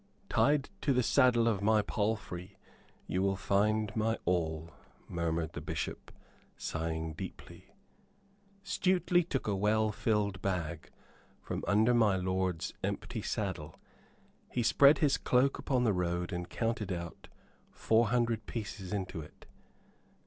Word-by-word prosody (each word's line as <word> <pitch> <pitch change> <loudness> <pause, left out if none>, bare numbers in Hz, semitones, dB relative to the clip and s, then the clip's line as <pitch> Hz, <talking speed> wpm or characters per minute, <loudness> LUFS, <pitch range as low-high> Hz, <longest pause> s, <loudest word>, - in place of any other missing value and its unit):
"Tied 145 0 +2
to 140 - +2
the 125 0 +2
saddle 120 -1 +4
of 105 -4 +1
my 105 +1 +3
palfrey 100 -3 -3 0.5
you 90 - -1
will 95 0 +2
find 105 +2 +1
my 110 +1 +1
all," 80 -2 -1 0.4
murmured 85 -1 -2
the - - -5
Bishop, - - -5 0.5
sighing 80 0 -3
deeply. 85 +4 -10 0.9
Stuteley 185 -2 +2
took 140 -5 -3
a 105 - 0
well 105 +2 +2
filled 105 -3 0
bag 85 -5 -3 0.5
from - - -5
under 110 +4 +4
my 110 -5 +4
lord's 95 -2 -1
empty - - -3
saddle. - - -3 0.7
He 120 - -1
spread 140 +5 +6
his 145 -3 +2
cloak 130 +2 +2
upon 130 -3 +1
the 110 -4 +3
road 90 0 -1
and 90 0 -4
counted 115 -3 -2
out 85 -2 -6 0.4
four 115 +1 +2
hundred 115 -1 0
pieces 100 -4 -5
into 95 -5 -3
it. 75 - -14
105 Hz, 130 wpm, -32 LUFS, 90-115 Hz, 0.9 s, spread